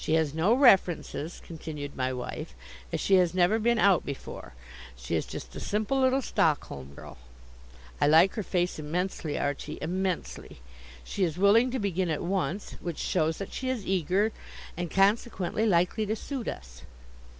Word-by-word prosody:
"She 155 - +1
has 160 -3 +1
no 175 +9 +3
references," 185 - +3
continued 150 -3 -7
my 130 0 -1
wife, 125 - -6 0.4
"as - - -1
she 195 - +4
has 180 -1 +2
never 185 +5 +3
been 235 +2 +2
out 200 -5 +4
before. 135 - -8 0.4
She - - -4
is - - -1
just - - -8
a - - -5
simple 215 +6 0
little 260 +1 +3
Stockholm 70 - -1
girl. 60 - -11 0.8
I - - +5
like 165 +5 +6
her 220 - -3
face 180 -3 -1
immensely, 160 0 -2
Archie 145 +1 -3
immensely. 185 - -3 0.4
She 195 - -2
is 165 -2 -1
willing 210 +6 +5
to 260 - -2
begin 190 -5 -1
at 155 - -2
once, 185 0 -2
which 170 -3 -4
shows 160 +1 0
that 195 - -7
she 260 - -3
is 240 -7 -2
eager, 190 +4 +1 0.4
and 175 0 -3
consequently 200 +2 +1
likely 185 +3 +2
to 215 - 0
suit 260 +1 -5
us. - - -7
180 Hz, 165 wpm, -28 LUFS, 155-210 Hz, 0.8 s, like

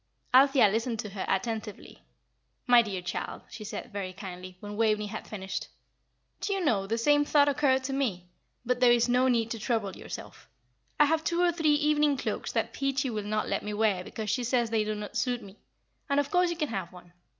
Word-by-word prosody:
Althea 270 -2 +6
listened 225 +3 -1
to 215 -1 -5
her 195 -1 -4
attentively. 220 -3 -3 0.6
"My 245 -2 +7
dear 195 -5 -4
child," 180 - -4
she 220 - -8
said, 215 +2 -7
very 190 -2 -4
kindly, 185 -1 -9
when 205 +1 -7
Waveney 215 -1 +2
had 205 - -7
finished, 195 -2 -5 0.7
"do 405 - -1
you 385 -3 -1
know 200 -8 +1
the 225 +3 -1
same 290 +5 +4
thought 290 0 +4
occurred 275 -2 +2
to 270 +1 -3
me; 225 -11 -1 0.4
but 250 +1 0
there 250 -1 +6
is 240 0 +4
no 250 +1 +3
need 230 -3 +1
to 230 - -3
trouble 215 -4 -1
yourself. - - -9 0.5
I 295 - +7
have 320 +2 +1
two 340 +1 0
or 350 - +4
three 320 -3 +2
evening 295 -1 +2
cloaks - - -3
that - - -1
Peachy 275 -1 -1
will 215 -1 -2
not 215 +1 -2
let - - -1
me 210 0 -4
wear 205 -4 +1
because 215 +2 -4
she 250 - 0
says 240 -1 +1
they 220 -1 +2
do 215 0 -2
not 210 0 -7
suit 245 -2 -1
me, 200 +1 -13 0.5
and 280 0 +3
of 285 - -1
course 360 0 +3
you 345 - -3
can 300 -3 -1
have 190 -5 -4
one. 175 -1 -15
230 Hz, 215 wpm, -28 LUFS, 210-275 Hz, 0.7 s, My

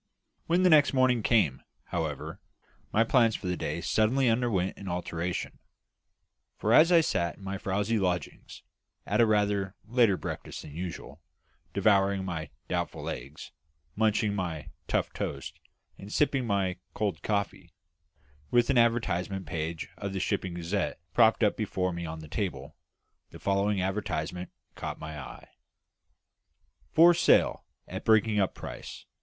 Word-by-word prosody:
When 175 +2 +3
the 185 - +6
next 150 -2 +6
morning 130 -3 +3
came, 105 - +2 0.2
however, 80 -5 -4 0.5
my 110 - +4
plans 115 -2 +3
for - - -7
the 90 0 0
day - - -3
suddenly 125 +5 +2
underwent 115 -6 +1
an 100 - -9
alteration; 90 0 -3 1.0
for - - +1
as 165 +3 +7
I 170 -2 +7
sat 85 - -1
in 100 - -15
my 95 0 -4
frowsy 105 +4 0
lodgings 90 -5 -3 0.4
at 105 +3 +2
a 115 - +5
rather 100 -2 +1
later 115 -4 +3
breakfast - - -6
than 75 - -11
usual, 85 -3 -6 0.5
devouring 100 -1 +2
my 80 -5 -4 0.2
doubtful - - -3
eggs, 70 +3 -7 0.4
munching 110 -1 +2
my 85 -7 -4 0.2
tough - - 0
toast, - - -5 0.4
and 100 +1 -9
sipping 135 -3 +1
my 95 -3 0 0.2
cold 100 -8 -1
coffee, 100 -4 -2 0.8
with 120 +2 +3
an 130 - +4
advertisement 100 -5 +1
page 80 +1 -4
of 100 -1 -4
the 95 - -2
Shipping 90 0 -2
Gazette 85 +1 -2
propped 115 0 +4
up 105 - +3
before 95 -4 -1
me 85 -1 -4
on 80 0 -6
the 80 - -10
table, - - -4 0.5
the - - -11
following 100 0 +1
advertisement 90 -3 -3 0.2
caught - - -5
my 80 -1 -7
eye. - - -10 1.4
"For 170 +2 +7
Sale, 170 - +3 0.2
at - - -6
Breaking 110 -1 +3
up 95 - +1
Price. - - -8
100 Hz, 145 wpm, -29 LUFS, 90-115 Hz, 1.4 s, as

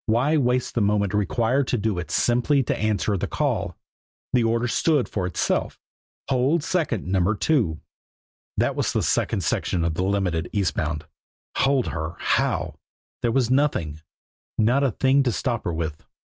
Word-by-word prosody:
Why 125 +8 +2
waste 125 -3 +1
the 120 - 0
moment 100 -1 +1
required 115 +6 +1
to 125 - 0
do 105 -4 -1
it 85 -3 -6
simply 125 - +2
to - - -1
answer 105 -1 0
the - - -2
call? - - -1 0.6
The 125 - +4
order 115 +1 +1
stood 145 +3 +2
for 95 -4 -2
itself 90 - -1 0.5
"Hold 135 +5 +2
second 150 - -1
Number 95 +2 +1
Two." 105 - +1 0.8
That - - +1
was - - -1
the - - +1
second - - +1
section 85 -2 0
of 85 - 0
the 90 - -1
Limited, 95 -4 0
east 100 -4 0
bound. 75 0 -2 0.5
Hold 135 -2 +2
her! 80 +1 -4
How? - - 0 0.4
There 120 - +1
was 125 -1 +1
nothing 90 - +1 0.6
not 120 +6 +3
a 135 - +3
thing 135 +5 +3
to 130 -3 +1
stop 120 +1 -2
her 85 - 0
with. 80 -2 -4
110 Hz, 165 wpm, -24 LUFS, 90-130 Hz, 0.8 s, The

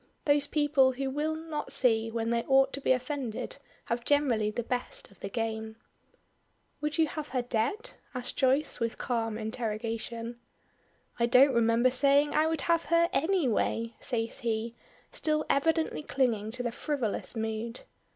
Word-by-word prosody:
Those 285 -1 +3
people 290 -4 +3
who 265 +1 -3
will 305 +3 -1
not 315 -2 -5
see 225 -3 +2
when 230 0 -2
they 235 0 +2
ought 270 0 +4
to 280 - -3
be - - +2
offended 255 -2 -2 0.3
have 235 +1 -2
generally 250 -7 +2
the 235 +3 -3
best 245 -2 -3
of 195 - -21
the 195 - -5
game. 220 0 -3 1.1
"Would 300 +1 -2
you 325 - +5
have 305 0 -5
her 255 -2 -1
dead?" 250 - -1 0.2
asks 250 0 -4
Joyce, 275 +2 +1
with 230 -1 -2
calm 225 -3 -1
interrogation. 230 +1 -4 0.8
"I 235 - +3
don't 260 +3 +6
remember 235 +2 +3
saying 280 +3 +3
I 310 +1 +3
would 320 -3 0
have 335 +1 +1
her 335 +1 +3
any 340 0 +2
way," 230 +1 0
says 230 -3 -2
he, 230 -2 -2 0.4
still 305 -1 +1
evidently 320 +3 +1
clinging 235 -8 0
to 245 +2 -4
the 240 - -1
frivolous 255 -4 -2
mood. 225 +1 -3
250 Hz, 160 wpm, -29 LUFS, 230-290 Hz, 1.1 s, don't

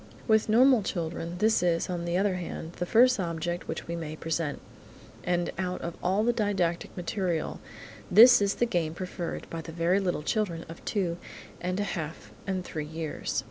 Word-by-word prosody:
With 220 -1 +3
normal 250 +2 +6
children, 170 -2 -3
this 220 +1 +3
is, 170 -2 +1
on 175 -2 -3
the 170 +1 0
other 195 0 +2
hand, 170 -1 -6
the 175 - -2
first 250 +3 +5
object 175 0 -3
which 160 - -4
we 170 - -3
may 160 -2 -5
present, 160 -2 -2 0.6
and 175 -1 0
out 180 -1 -2
of 170 0 -4
all 190 +4 +2
the 240 +1 +3
didactic 190 -8 -1
material 175 -2 -2 0.5
this 235 +4 +9
is 200 -1 +2
the 240 - +2
game 170 -8 -1
preferred 180 -1 -5
by 165 - -4
the 165 - -8
very 170 +4 +2
little 180 -6 -1
children 175 -4 -1
of 165 - -11
two 180 -5 -1 0.4
and 180 +2 -2
a - - +1
half 165 -5 -5 0.2
and 185 -2 -2
three 155 - -4
years. 160 0 -3
175 Hz, 180 wpm, -28 LUFS, 165-200 Hz, 0.6 s, this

